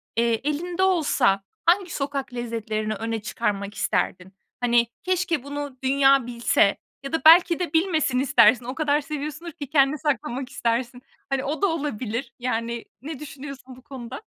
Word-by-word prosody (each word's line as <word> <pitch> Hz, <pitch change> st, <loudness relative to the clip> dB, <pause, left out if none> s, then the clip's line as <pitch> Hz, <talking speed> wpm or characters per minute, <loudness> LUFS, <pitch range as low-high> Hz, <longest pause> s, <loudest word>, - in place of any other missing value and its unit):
eee, 235 Hz, +1 st, +2 dB, 0.2 s
elinde 350 Hz, +5 st, -2 dB
olsa 285 Hz, -, +2 dB, 0.2 s
hangi 355 Hz, +1 st, +3 dB
sokak 275 Hz, -2 st, -3 dB
lezzetlerini 220 Hz, -3 st, -3 dB
öne 225 Hz, +1 st, -3 dB
çıkarmak 205 Hz, -2 st, -2 dB
isterdin? 185 Hz, -2 st, -1 dB, 0.3 s
Hani, 240 Hz, -1 st, +3 dB, 0.2 s
keşke 360 Hz, -5 st, 0 dB
bunu 285 Hz, -1 st, -6 dB
dünya 270 Hz, -1 st, +4 dB
bilse 235 Hz, -4 st, +2 dB, 0.3 s
ya 275 Hz, -, -6 dB
da 325 Hz, -, +1 dB
belki 340 Hz, +1 st, +7 dB
de 350 Hz, -4 st, -3 dB
bilmesin 320 Hz, -6 st, +2 dB
istersin. 240 Hz, -2 st, +5 dB
O 255 Hz, +2 st, -5 dB
kadar 300 Hz, -1 st, +1 dB
seviyorsundur 300 Hz, +3 st, -5 dB
ki 290 Hz, -2 st, -8 dB
kendine 280 Hz, 0 st, +3 dB
saklamak 265 Hz, -3 st, -2 dB
istersin. 245 Hz, 0 st, -2 dB, 0.3 s
Hani, 270 Hz, -1 st, 0 dB
o 295 Hz, +6 st, -3 dB
da 400 Hz, -, +4 dB
olabilir. 265 Hz, -, -3 dB
Yani, 235 Hz, -1 st, -2 dB, 0.2 s
ne 295 Hz, +1 st, -7 dB
düşünüyorsun 275 Hz, -3 st, -9 dB
bu 255 Hz, -, -16 dB
konuda? 250 Hz, -, -8 dB
270 Hz, 150 wpm, -24 LUFS, 235-300 Hz, 0.3 s, belki